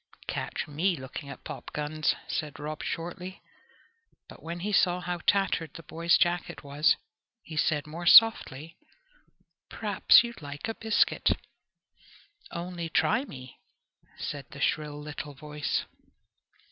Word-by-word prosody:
"Catch - - -3
me 170 +5 +1
looking 130 +1 -8
at 140 - -9
popguns!" 150 +1 -2
said 150 -2 -3
Rob 150 +1 -5
shortly. 180 +3 -5 0.8
But - - -13
when 170 +2 -6
he 210 +3 -2
saw 180 -2 +4
how 180 -1 -3
tattered 195 -6 +2
the 165 - -9
boy's 165 +3 +2
jacket 175 -2 0
was, 145 +2 +3 0.5
he 160 - -9
said 150 -1 +1
more 165 +3 -6
softly, 165 -9 +6 0.9
"P'r'aps - - +5
you'd 235 -4 -7
like 145 +3 -6
a 225 - -2
biscuit?" 220 -1 +2 1.1
"Only 170 -1 -5
try 160 - +2
me!" 130 - -11 0.6
said 145 -2 -5
the 140 - -10
shrill 150 0 0
little 150 -1 -7
voice. 150 +1 -2
155 Hz, 125 wpm, -28 LUFS, 150-175 Hz, 1.1 s, softly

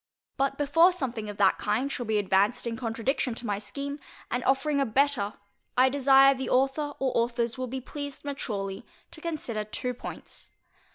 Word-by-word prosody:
But 275 0 0
before 325 +5 +5
something 245 -11 -3
of 205 - -7
that 195 -2 +4
kind 255 +7 0
shall 245 -4 -4
be 220 -1 +2
advanced 205 +4 +2
in 235 -1 -2
contradiction 230 +2 -1
to 240 - -6
my 205 -2 -1
scheme, 280 +6 -5 0.3
and 245 0 -1
offering 280 +2 +2
a 275 - +3
better, 250 -3 +1 0.4
I 260 +1 +6
desire 275 0 +6
the 265 0 -4
author 275 +3 +1
or 265 -1 0
authors 235 0 +1
will 255 -1 -3
be 260 +2 -4
pleased 285 +2 -7
maturely 200 -9 -4 0.3
to 315 - -8
consider 290 -10 -3
two 250 +4 -3
points. 245 - -7
255 Hz, 175 wpm, -28 LUFS, 225-280 Hz, 0.4 s, I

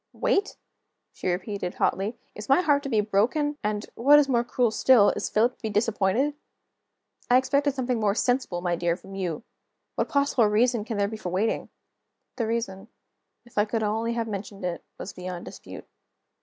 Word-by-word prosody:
"Wait?" 400 +1 0 0.6
she - - -5
repeated, 180 0 -2
hotly. 205 +5 0 0.2
"Is 210 +3 -9
my 275 +6 +5
heart 290 -4 +3
to 275 - -5
be 220 -4 +3
broken? 255 +9 0
and, 210 0 -1
what 285 +5 +6
is 295 -2 +4
more 240 -3 +2
cruel 240 -1 +1
still, 220 -1 +5
is - - -3
Philip 235 +4 +2
to - - -31
be 220 - -2
disappointed? 215 +5 +1 1.0
I 245 - +6
expected 280 +2 +1
something 250 -3 -1
more 205 -2 +1
sensible, 245 -8 0
my 175 -1 0
dear, 170 0 0
from 195 +2 -13
you. 185 -2 -3 0.5
What - - -1
possible 280 -5 +3
reason 225 +1 +2
can 225 -2 -4
there 200 0 +2
be 220 +1 -6
for 185 - -5
waiting?" 195 +5 -1 0.7
The 230 -4 -1
reason 220 -3 -3 0.6
if 240 -3 -4
I 205 - +4
could 220 +1 -2
only 225 +2 0
have 230 -1 -2
mentioned 200 -2 -6
it 175 -1 -3
was 195 - -7
beyond 180 -1 -6
dispute. - - -10
220 Hz, 185 wpm, -26 LUFS, 195-250 Hz, 1.0 s, what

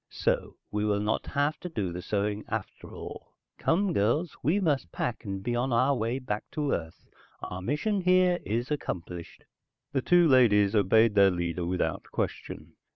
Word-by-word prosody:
So - - -1 0.2
we 105 0 -1
will 105 -1 +1
not 105 +1 -1
have 145 +2 0
to 180 - -6
do 100 - -2
the 90 - -5
sewing 105 +2 -1
after 110 -3 -5
all. - - -9 0.3
Come 185 +2 +1
girls, 145 - +1
we 175 +7 +2
must 145 - 0
pack 120 - -3
and 95 -1 -4
be 120 +2 -1
on 125 +2 0
our 130 +4 +3
way 115 +1 -1
back 105 -5 -4
to 150 -2 -1
Earth. 80 -1 -5 0.4
Our 90 - -5
mission 150 - 0
here 180 0 +4
is 120 +6 -2
accomplished." 90 - -5 0.5
The 135 -2 0
two 175 +2 +5
ladies 105 -7 +5
obeyed 110 +2 +4
their 100 -1 +6
leader 85 -1 -2
without 90 +1 -1
question. - - -4
115 Hz, 170 wpm, -28 LUFS, 100-145 Hz, 0.5 s, their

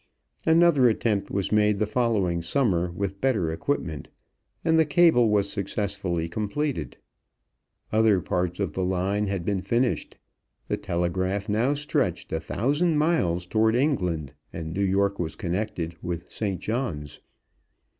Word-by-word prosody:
Another 160 -6 +5
attempt 110 -2 0
was 100 -1 -2
made 105 -1 +3
the 110 - +1
following 105 -7 0
summer 90 -4 +1
with 100 +2 -4
better 110 -12 +1
equipment, 80 - -3 0.6
and 160 -1 +4
the - - +6
cable 150 -6 +4
was 105 -1 +2
successfully 100 -4 -2
completed. 110 - -3 0.9
Other 110 -3 +4
parts 90 -1 -2
of 100 -4 -1
the 95 - -1
line 95 +3 0
had 95 -3 -3
been 100 -2 0
finished, 120 +4 -1 0.5
the - - -1
telegraph 95 +3 -1
now 115 +7 +1
stretched 145 +1 -1
a 80 - 0
thousand 145 - 0
miles 95 - +1
toward 110 +4 +2
England, 90 - 0 0.2
and 80 -1 -5
New 100 - -2
York 100 +1 +1
was 80 -3 -3
connected 90 -2 -3
with 85 -1 -5
St. 100 -4 -2
John's. 100 - -3
100 Hz, 135 wpm, -26 LUFS, 90-120 Hz, 0.9 s, the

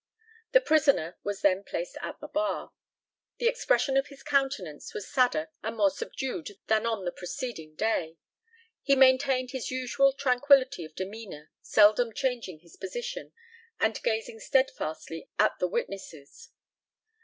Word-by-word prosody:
The - - +7
prisoner 285 - +2
was 205 -1 -3
then 195 0 +3
placed - - -5
at - - -6
the - - -8
bar. 315 +1 -2 0.6
The 475 - +1
expression 475 - +2
of 270 +1 +2
his 280 -2 -14
countenance 270 - -1
was 200 - -5
sadder 245 - +1
and 220 +1 -4
more 200 -2 +4
subdued 205 -7 -5
than 220 +1 +2
on 220 -5 -2
the 175 - -1
preceding 180 - -6
day. 165 -5 -1 0.6
He 275 - +3
maintained 260 -1 +4
his 260 -3 -4
usual 260 +2 +2
tranquillity 270 -4 +3
of 155 0 -14
demeanour, 190 -6 -7
seldom 215 +2 +4
changing 240 - -2
his 170 -1 -18
position, 485 +5 -5 0.5
and 220 0 +1
gazing 220 0 -2
steadfastly 165 - -1
at 215 - +2
the 180 - +1
witnesses. 170 -6 -6
230 Hz, 140 wpm, -28 LUFS, 190-275 Hz, 0.6 s, The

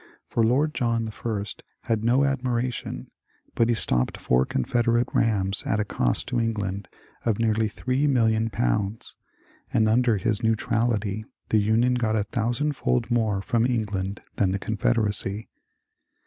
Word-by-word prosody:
For 115 - 0
Lord 140 +7 +2
John 115 -4 0
I 105 -3 -3 0.4
had 110 -1 -1
no 125 +4 +3
admiration, 125 -3 -2 0.5
but 115 0 +2
he 120 - +3
stopped 60 - +1
four 65 +1 +1
Confed 115 - 0
erate 120 +1 +2
rams 100 -4 +1
at 110 - 0
a 105 - 0
cost - - -1
to - - 0
England 105 -4 -2 0.4
of 110 -4 +1
nearly 110 -1 +1
three 130 +6 -1
million 115 -4 +2
pounds, 100 - -1 0.6
and 110 - +3
under 115 0 +3
his 110 0 0
^' - - -14
neutrality 110 -2 0
" - - -45
the 110 - +3
Union 110 +4 +2
got 115 -3 0
a 105 - +1
thousandfold 120 - -1
more 110 -5 +1
from 115 +2 +1
England 105 -5 -2
than 95 - +2
the 95 - 0
Confederacy. 105 -1 -1
110 Hz, 150 wpm, -25 LUFS, 105-120 Hz, 0.6 s, no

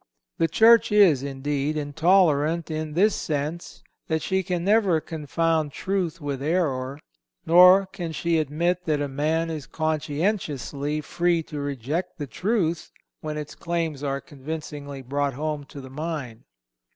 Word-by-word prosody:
The 165 - +3
Church 225 +8 +5
is, 190 -10 +5
indeed, 140 +2 -2
intolerant 160 +1 +2
in 155 -1 -3
this 205 +4 +4
sense, 155 +3 -4 0.2
that 160 -1 -1
she 190 0 +1
can 175 -1 -2
never 200 -5 +3
confound 160 -1 -1
truth 185 -4 -2
with 140 -3 -4
error; 140 -4 -1 0.5
nor 180 +3 +7
can 175 -3 -6
she 165 +1 0
admit 170 +4 -1
that 150 -2 +1
any 145 -2 -3
man 160 +4 0
is 155 -3 -6
conscientiously 150 - -2
free 170 +1 0
to 150 -1 -7
reject 145 +4 -3
the 145 - -4
truth 175 - -1 0.3
when 155 -1 -5
its 150 -1 -6
claims 165 -4 -3
are 140 -1 -1
convincingly 145 -1 -7
brought 140 +1 -1
home 150 0 -3
to 140 - -11
the 130 -1 -10
mind. 145 -6 -5
155 Hz, 140 wpm, -25 LUFS, 145-170 Hz, 0.5 s, nor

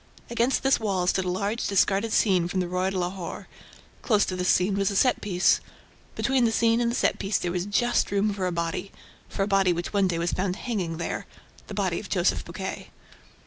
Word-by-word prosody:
Against 235 +3 +1
this 270 0 +3
wall 195 -5 0
stood 185 +1 +1
a - - -1
large 200 +5 -1
discarded 200 +2 +2
scene 185 -6 +3
from 185 +1 -2
the 180 - -1
ROI 180 +1 0
DE 190 - -3
LAHORE. 180 0 -4 0.5
Close 210 -4 +3
to 185 - -3
this 180 0 -1
scene 190 +2 +3
was 195 -1 +1
a 200 - -3
set 250 +5 +3
piece. 185 -3 +2 0.5
Between 265 -2 +1
the 225 - +2
scene 230 +1 +2
and 235 - +1
the 235 - -2
set - - +1
piece 195 0 0
there 175 - -2
was 180 +2 -2
just 240 +4 +1
room 205 +1 +1
for 190 -2 -2
a - - -1
body... 170 +3 -3 0.4
for 195 - -1
a - - -1
body 195 -2 +3
which 175 +3 -3
one 200 -2 +3
day 175 -2 -1
was 170 +1 -1
found 185 -1 -1
hanging 190 -9 -3
there. 170 - -4 0.4
The - - -7
body - - 0
of - - -9
Joseph - - +1
Buquet. - - -6
195 Hz, 225 wpm, -26 LUFS, 180-215 Hz, 0.5 s, this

